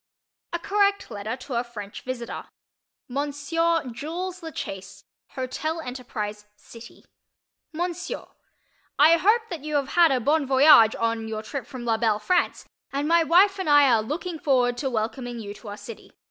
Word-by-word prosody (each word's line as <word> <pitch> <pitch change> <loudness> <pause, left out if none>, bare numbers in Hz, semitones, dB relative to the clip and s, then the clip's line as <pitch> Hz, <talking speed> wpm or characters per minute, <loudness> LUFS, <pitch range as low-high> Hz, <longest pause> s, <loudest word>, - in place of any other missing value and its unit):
A 345 - -1
CORRECT 400 +3 +1
LETTER 210 +4 -4
TO 255 +1 -8
A 235 0 0
FRENCH 210 -4 -9
VISITOR 250 -2 -6 0.6
Monsieur 290 +5 0
Jules 345 +9 -5
La 325 - -6
Chaise, 195 -6 -7 0.3
Hotel 310 +5 -3
Enterprise, 220 -6 -6
City. 230 +2 -14 0.7
MONSIEUR: 350 +2 -4 0.7
I 320 +3 +7
hope 430 +7 +3
that 325 -5 -5
you 305 0 -3
have 280 -1 0
had 340 -3 +5
a 260 - +2
bon 290 +3 +1
voyage 265 -4 +7
on 230 -1 -1
your 215 -1 -4
trip 270 +4 -6
from 250 -2 -8
la 225 -1 +1
belle 220 -2 +2
France, 285 +13 0 0.2
and 280 +2 -1
my 335 +1 +4
wife 380 +5 +4
and 375 - -2
I 290 -2 +6
are 225 -2 +4
looking 320 - -4
forward 250 -4 +2
to 270 +1 -1
welcoming 240 +1 -3
you 205 -3 -6
to 210 - -14
our 205 0 -6
city. 210 +2 -11
270 Hz, 165 wpm, -25 LUFS, 230-330 Hz, 0.7 s, I